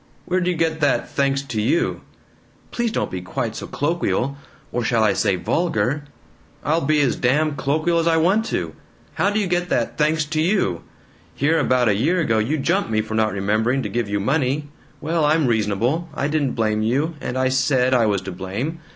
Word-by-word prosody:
"Where 185 +1 +1
d' 180 - -1
you 180 - +1
get 160 -1 -1
that 145 -2 +2
'thanks 140 0 0
to 115 -6 -3
you'?" 125 +10 0 0.7
"Please 240 -1 -1
don't - - -2
be 90 - -4
quite 115 +4 -3
so - - -6
colloquial 145 -3 -1 0.4
or 120 - -1
shall 115 -2 +2
I 105 -2 +3
say 95 - +1
VULGAR?" 150 - -1 0.6
"I'll 160 +3 +1
be 150 +1 +2
as 135 - +2
damn 150 +4 +1
colloquial 155 +5 +1
as 165 - 0
I 165 -1 +3
want 190 +7 +2
to. - - -3 0.4
How - - +1
do 205 +1 0
you 205 - 0
get 175 0 -1
that 120 - -1
'thanks 155 +1 +2
to 155 +1 -1
you'? 170 - +1 0.5
Here 160 +4 +2
about 130 -4 +2
a 105 - +4
year 155 - +1
ago 115 -10 +1
you 130 +9 0
jump 170 - 0
me 110 -1 +1
for 110 0 -7
not 110 -1 +2
remembering 110 +7 0
to - - -3
give 120 -3 -2
you 100 0 0
money. 140 +5 0 0.3
Well, 160 +1 0
I'm 155 +1 +3
reasonable. 115 - 0
I 140 - -1
didn't 145 -3 0
blame 110 -2 0
you, 135 +9 0
and 125 - -3
I 130 0 +2
SAID 130 -1 +2
I 120 -3 +4
was 100 -3 +1
to 95 - -5
blame. 100 - -4
140 Hz, 205 wpm, -21 LUFS, 115-160 Hz, 0.7 s, a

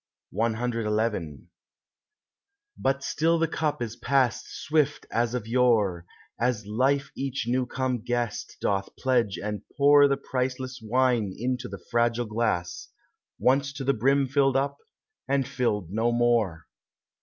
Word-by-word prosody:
CXI 110 - -1 1.3
But 135 +1 -1
still 165 +4 +1
the 165 0 +1
cup 150 -5 -1
is 115 -1 -5
passed 130 +1 +1
swift 150 -1 0
as 120 +1 0
of 120 -4 -3
yore, 110 -8 +2 0.3
As 120 -3 0
life 135 +6 +1
each 135 -2 -3
new 125 +1 +1
come 130 0 -1
guest 120 -1 -3
doth 100 -1 0
pledge 120 -6 +1
and 105 -1 -4 0.2
pour 145 0 +7
The 140 -1 +1
priceless 130 -1 -3
wine 120 -2 +1
into 125 +2 -2
the - - -9
fragile 120 0 +2
glass, 105 -6 -2 0.5
Once 140 +2 +2
to 140 - -5
the 140 +1 +2
brim 135 +4 +2
filled 135 0 +2
up, 140 +1 -1 0.5
and 135 -2 +1
filled 105 -8 -1
no 115 +3 +1
more. 115 -9 +1
120 Hz, 130 wpm, -26 LUFS, 110-135 Hz, 1.3 s, pour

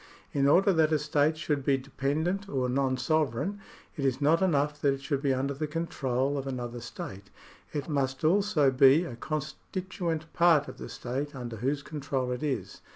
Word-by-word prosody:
In 140 -1 +3
order 190 +7 +5
that 160 -2 +3
a 155 - +4
state 150 +1 +1
should 150 -3 -1
be 135 0 +3
dependent 155 +9 -2
or 130 -2 0
non 130 0 +1
sovereign, 155 - 0 0.4
it 145 - -4
is 130 -1 +1
not 155 +4 +3
enough 150 -5 +1
that 140 -1 +3
it 135 - -11
should 140 -2 -1
be 140 -2 +2
under 135 +2 0
the 150 +3 -3
control 140 -4 -1
of 135 - -6
another 120 -2 -4
state; 100 -4 -8 0.4
it 145 - -3
must 135 -3 -1
also 165 -4 +3
be 135 +5 +6
a 130 -9 -6
constituent 160 +4 -4
part 165 -4 +4
of - - -9
the - - -7
state 135 +4 -4
under 120 -3 -6
whose 140 +5 -1
control 140 -4 -3
it 125 - -3
is. 145 -3 -3
145 Hz, 185 wpm, -29 LUFS, 130-155 Hz, 0.4 s, be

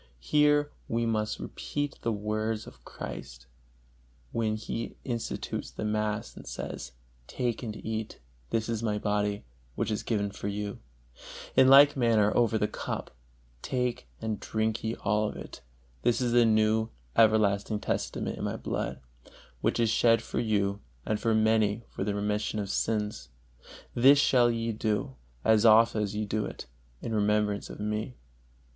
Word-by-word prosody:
Here 145 - +3 0.2
we 115 +1 0
must 110 -2 0
repeat 145 -1 -4
the 115 - 0
words 110 +1 -2
of - - -14
Christ, 65 +1 -8 0.9
when 110 -2 0
He 110 +1 -5
institutes 120 -3 -3
the - - -5
mass 105 0 -1
and - - -11
says, 65 - -6 0.3
"Take 120 -3 -2
and 110 -4 -5
eat, 110 0 -4 0.3
this 110 -1 0
is 115 -1 -2
My 105 -2 0
Body, 105 -3 -1 0.3
which - - -1
is 105 - -1
given 100 -3 -1
for 100 - -6
you"; 105 0 -4 0.8
in 130 - +7
like 140 +2 +8
manner 115 -5 +3
over 115 -2 +3
the 105 - +1
cup, - - -5 0.5
"Take 125 -2 -2
and 110 -2 -3
drink 110 0 -1
ye 110 +1 -1
all 105 +1 0
of - - -8
it: - - -9 0.4
this 120 -1 +2
is 120 -2 0
a 120 -1 +6
new, 110 0 +3 0.3
everlasting 105 -1 +3
Testament - - -2
in - - -4
My - - -1
Blood, - - -3 0.6
which - - 0
is 115 -2 +3
shed 115 0 +4
for - - -3
you 100 -3 0 0.3
and 110 -1 0
for 115 -1 +2
many 110 0 +2
for - - -4
the 100 0 -1
remission 105 +1 -1
of 100 -2 -2
sins. 105 -1 -1 0.6
This 135 +4 +7
shall 125 -4 +4
ye 115 0 -1
do, 110 - -1 0.3
as 110 -1 +5
oft 115 +1 +6
as 105 -1 -1
ye 105 0 -1
do 105 +1 -1
it, - - -8 0.4
in 115 - -3
remembrance 105 -1 +1
of - - -9
Me." 105 +4 -3
110 Hz, 160 wpm, -29 LUFS, 105-115 Hz, 0.9 s, like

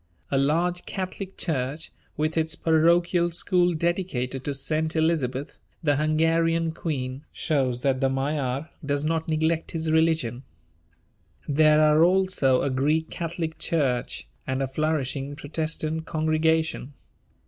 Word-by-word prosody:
A 135 - +2
large 170 +5 +1
Catholic 190 0 -5
church, 145 -1 -2 0.3
with 155 +1 0
its 160 -1 0
parochial 170 +2 +3
school 175 0 +1
dedicated 155 -7 -1
to 145 - -1
St. 155 +4 -1
Elizabeth, 145 -5 0 0.2
the 145 -3 +2
Hungarian 165 +2 +2
queen, 135 -5 -4
shows 130 -6 -1
that 135 -1 +1
the 135 - +3
Magyar 135 +1 -2
does 145 0 -1
not 160 0 -1
neglect 160 +1 0
his 160 -1 -1
religion. 160 -7 +2 1.1
There 155 +1 +5
are 155 +1 +5
also 180 -8 +3
a 140 - 0
Greek 150 +5 0
Catholic 165 -2 -4
church 135 -7 -1 0.2
and 130 +1 -1
a - - -1
flourishing 140 -1 -2
Protestant 160 +1 -3
congregation. 160 -2 0
155 Hz, 125 wpm, -25 LUFS, 140-165 Hz, 1.1 s, There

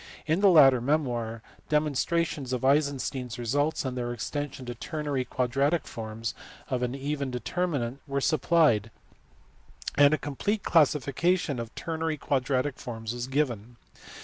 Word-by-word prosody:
In 160 +3 +1
the 200 - +7
latter 135 -8 +7
memoir 120 -5 -1 0.3
demonstrations 150 -2 0
of 125 +1 -1
Eisenstein 140 -2 +1
s 115 - -7
results 145 +6 0
and 130 -1 -3
their 120 -1 -2
extension 135 +2 -4
to 120 - -4
ternary 145 +1 -3
quadratic 135 +6 0
forms 115 0 -5 0.4
of 125 -1 0
an 125 +1 -1
even 140 0 -3
determinant 135 -1 -2
were 140 0 -1
supplied, 140 - +3 1.0
and 145 0 +6
a 155 - +3
complete 195 +10 -2
classification 150 0 +2
of 115 -1 -7
ternary 160 -1 -2
quadratic 135 0 0
forms 115 -2 -5
was 120 0 -4
given. 125 -5 -1
135 Hz, 135 wpm, -28 LUFS, 120-150 Hz, 1.0 s, the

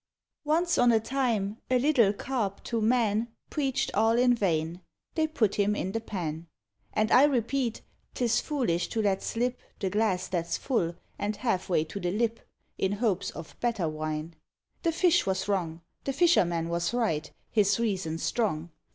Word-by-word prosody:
Once 335 +3 +2
on 245 -1 +6
a 225 - +4
time, 225 -4 -1
a 255 - +4
little 250 -6 +4
Carp 210 -2 -3
to 230 -2 -2
man 225 -1 +2 0.2
Preached 275 -4 -1
all 225 +2 +3
in 245 0 +5
vain; 170 -5 0 0.3
they 315 -1 +1
put 225 -10 +1
him 205 0 +1
in 190 - -2
the 225 - -2
pan. 170 -6 -4 0.4
And 215 +1 +1
I 265 - +8
repeat, 250 -2 0 0.3
'tis 235 -3 +2
foolish 240 - 0
to 225 - -1
let 195 -2 +1
slip 245 +2 -1 0.2
The 190 -2 -1
glass 205 -3 +1
that's 170 -2 -1
full, 175 -11 -1 0.2
and 210 +1 -1
half 215 -8 -1
way 170 -4 +3
to 160 +5 -7
the 175 - -1
lip, 225 +4 0 0.4
In 190 +1 +1
hopes 205 -3 0
of 165 - -9
better 225 -8 0
wine. 155 +1 -4 0.5
The 335 - +2
fish 340 - +3
was 190 0 0
wrong; 170 -5 -1 0.2
The 275 - -1
fisherman 175 - +3
was 170 +6 -1
right, 160 -11 0 0.2
his 205 -1 +3
reason 190 -8 -1
strong. 170 -4 -1
210 Hz, 170 wpm, -28 LUFS, 180-245 Hz, 0.5 s, I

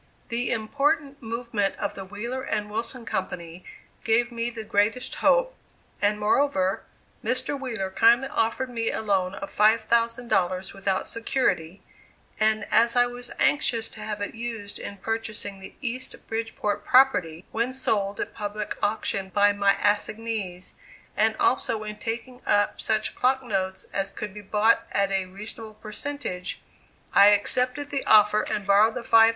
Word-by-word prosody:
This 240 +1 -1
important 280 +5 0
movement 225 -3 -2
of 205 - -3
the 195 - -7
Wheeler 220 +7 -5
and 210 -5 -2
Wilson 230 +2 -3
Company 175 -4 -4 0.4
gave 235 +2 +2
me 235 0 -2
the 230 -2 -7
greatest 210 +4 0
hope, - - +3 0.5
and 210 +1 +2
moreover, 210 -4 +2 0.4
Mr. 255 +5 +1
Wheeler 235 -9 -3
kindly 235 +6 +4
offered 250 +3 -1
me 230 -2 -1
a - - -2
loan 195 -2 0
of 195 0 -8
$5,000, 220 -4 +2
without 195 -1 -1
security, 215 -7 -1 0.6
and 215 0 +2
as 235 +1 +4
I 245 0 +5
was 245 0 -7
anxious 230 -6 +2
to - - -12
have 210 -1 -5
it 205 - -3
used 225 -3 -5
in 200 - -6
purchasing 215 -2 -3
the 190 - -11
East 255 0 -3
Bridgeport 225 -2 -3
property, 190 -12 +3
when 235 +3 0
sold 205 -6 0
at - - -3
public 210 0 -4
auction 200 -2 -1
by 205 +1 +4
my 200 -1 +3
assignees, 210 -3 -2 0.4
and 220 +1 +2
also 225 -4 +1
in 210 0 -6
taking 235 +3 -5
up 205 0 +2
such 215 0 0
clock 260 +1 +1
notes 190 -5 -2
as 195 0 -1
could 205 0 -6
be 210 - -8
bought 210 +3 +3
at 200 0 +1
a 195 -1 0
reasonable 215 +3 -9
percentage, 215 -5 -5 0.5
I 200 - +8
accepted 250 +7 +2
the 280 -1 -1
offer 210 0 +6
and 205 - -2
borrowed 205 +3 +4
the - - -3
$5,000. 225 -1 +6
220 Hz, 150 wpm, -25 LUFS, 200-235 Hz, 0.6 s, I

